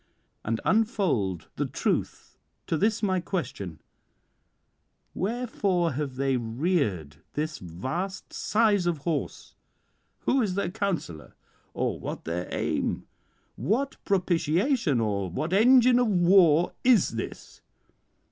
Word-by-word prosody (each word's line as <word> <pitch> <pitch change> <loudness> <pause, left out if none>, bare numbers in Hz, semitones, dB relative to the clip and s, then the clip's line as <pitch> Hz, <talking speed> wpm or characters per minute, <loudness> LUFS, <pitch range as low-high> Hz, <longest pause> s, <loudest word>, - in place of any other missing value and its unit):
And 115 +1 -1
unfold 170 - +1
the - - 0
truth - - -2 0.3
to - - -1
this 215 +6 +1
my 185 -2 +2
question: 100 - -4 1.3
wherefore 195 -5 0
have 140 -1 -3
they 135 0 +1
reared 115 - -1 0.2
this 155 0 -3
vast 130 - -5
size 210 -4 +2
of 170 -2 +1
horse? 165 -4 -3 0.7
who 270 - +2
is 195 -5 -1
their 195 -3 -1
counsellor? 170 - -3 0.4
or - - -1
what - - -6
their 85 +2 -3
aim? - - -1 0.5
what 270 +7 -1
propitiation, 180 - +1
or 100 -4 -1
what 155 - -3
engine 245 +3 +6
of 245 - +3
war 175 -4 +4
is 240 -7 +5
this?" 115 0 -7
175 Hz, 110 wpm, -27 LUFS, 125-205 Hz, 1.3 s, engine